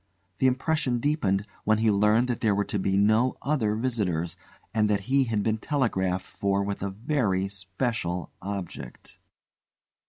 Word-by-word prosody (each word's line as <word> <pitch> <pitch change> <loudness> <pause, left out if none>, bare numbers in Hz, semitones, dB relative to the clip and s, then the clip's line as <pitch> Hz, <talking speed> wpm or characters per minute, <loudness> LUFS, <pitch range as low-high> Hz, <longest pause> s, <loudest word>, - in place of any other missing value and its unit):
The 130 - +4
impression 130 -1 +1
deepened 110 -8 +1 0.2
when 110 0 +3
he 110 0 +3
learned 105 +4 +3
that 120 - -2
there 105 -3 +3
were 100 0 +1
to 105 - -2
be 95 +1 +1
no 110 +5 +3
other 130 -8 +1
visitors, 95 -9 -1 0.4
and 105 -2 +2
that 100 -1 +2
he 135 +5 +2
had 110 -3 0
been 110 0 0
telegraphed 95 -10 0
for 100 0 -1
with 100 0 -3
a 100 - -1
very 100 -3 0
special 95 -1 -3
object. 95 -10 -7
105 Hz, 155 wpm, -27 LUFS, 95-120 Hz, 0.4 s, The